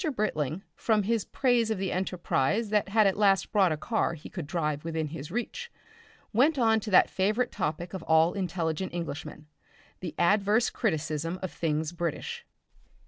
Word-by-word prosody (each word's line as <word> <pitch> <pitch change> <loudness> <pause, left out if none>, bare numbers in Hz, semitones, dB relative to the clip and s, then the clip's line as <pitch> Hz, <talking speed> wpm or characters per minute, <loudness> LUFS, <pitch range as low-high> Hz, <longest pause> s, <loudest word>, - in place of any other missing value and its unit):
Britling, 170 - -1
from 215 -2 +1
his 225 0 0
praise 245 -4 +1
of 220 - 0
the 190 0 -2
enterprise 185 - 0
that 210 -2 +2
had 215 +1 +4
at 195 +1 +2
last 195 -2 +3
brought 195 -5 +4
a 155 - -1
car 220 -1 -1
he 150 - -11
could 170 -6 -6
drive 150 -3 -2
within 160 -2 -2
his 145 -1 -7
reach, 475 - -4 0.6
went 280 +7 +4
on 225 -3 +4
to 215 - -6
that 185 - +6
favourite 215 +6 0
topic 165 +4 -3
of 190 - -4
all 160 +2 +4
intelligent 175 -2 -2
Englishmen, 155 -3 -5 0.5
the 170 -4 -6
adverse 205 +5 +3
criticism 165 - -1
of 185 - -3
things 155 -1 -1
British. 320 - -4
185 Hz, 165 wpm, -28 LUFS, 160-215 Hz, 0.6 s, that